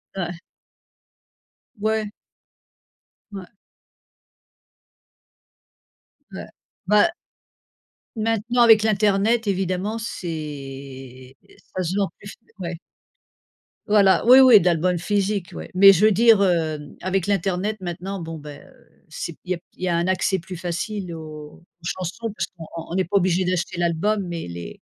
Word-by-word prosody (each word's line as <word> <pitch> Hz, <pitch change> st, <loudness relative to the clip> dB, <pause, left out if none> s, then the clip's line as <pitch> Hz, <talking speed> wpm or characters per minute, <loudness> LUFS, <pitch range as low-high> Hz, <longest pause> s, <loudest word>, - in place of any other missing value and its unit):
Ouais. 175 Hz, -2 st, -4 dB, 1.4 s
Ouais. 215 Hz, 0 st, 0 dB, 1.2 s
Ouais 190 Hz, -2 st, -8 dB, 2.8 s
Ouais -, -, -8 dB, 0.4 s
bah 210 Hz, -, +5 dB, 1.1 s
maintenant 225 Hz, +2 st, 0 dB
avec 220 Hz, -2 st, +7 dB
l'internet 210 Hz, +1 st, +2 dB
évidemment 190 Hz, +3 st, -1 dB
c'est 220 Hz, -6 st, -5 dB, 1.1 s
est -, -, -22 dB, 0.2 s
ça 185 Hz, -, -1 dB
se 175 Hz, +3 st, -2 dB
vend 200 Hz, -3 st, +1 dB
plus, 205 Hz, -, -10 dB, 0.3 s
ouais. 170 Hz, -2 st, -5 dB, 1.1 s
Voilà 205 Hz, -3 st, +4 dB
oui, 255 Hz, +2 st, +9 dB
oui, 255 Hz, -5 st, +8 dB
d'album 175 Hz, +1 st, +1 dB
physique 200 Hz, 0 st, -1 dB
ouais. -, -, -8 dB
Mais 195 Hz, +2 st, +8 dB
je 195 Hz, +4 st, +3 dB
veux 215 Hz, -, +5 dB
dire, 225 Hz, +1 st, +5 dB
hem, 160 Hz, -5 st, -1 dB
avec 185 Hz, 0 st, -1 dB
l'internet 195 Hz, +1 st, -1 dB
maintenant 185 Hz, +2 st, -5 dB
bon 165 Hz, -1 st, -6 dB
ben, 145 Hz, -1 st, -10 dB
heu, -, -, -25 dB
c'est 160 Hz, +1 st, -6 dB
il 185 Hz, -, -6 dB
y -, -, +2 dB
a -, -, -8 dB, 0.2 s
il -, -, -10 dB
y -, -, 0 dB
a 175 Hz, -, +1 dB
un 170 Hz, -, 0 dB
accès 185 Hz, +1 st, +1 dB
plus 180 Hz, +1 st, -9 dB
facile 180 Hz, +2 st, -4 dB
aux 155 Hz, 0 st, -10 dB, 0.2 s
chansons 185 Hz, +6 st, -4 dB
parce 205 Hz, -, -3 dB
qu'on 165 Hz, -2 st, -9 dB, 0.3 s
on -, -, -3 dB
n'est 190 Hz, 0 st, +1 dB
pas 200 Hz, -, +1 dB
obligé 185 Hz, -1 st, +1 dB
d'acheter 180 Hz, 0 st, -2 dB
l'album 180 Hz, +5 st, 0 dB
mais 170 Hz, -, -5 dB
les 85 Hz, -1 st, -8 dB
185 Hz, 135 wpm, -22 LUFS, 170-210 Hz, 2.8 s, oui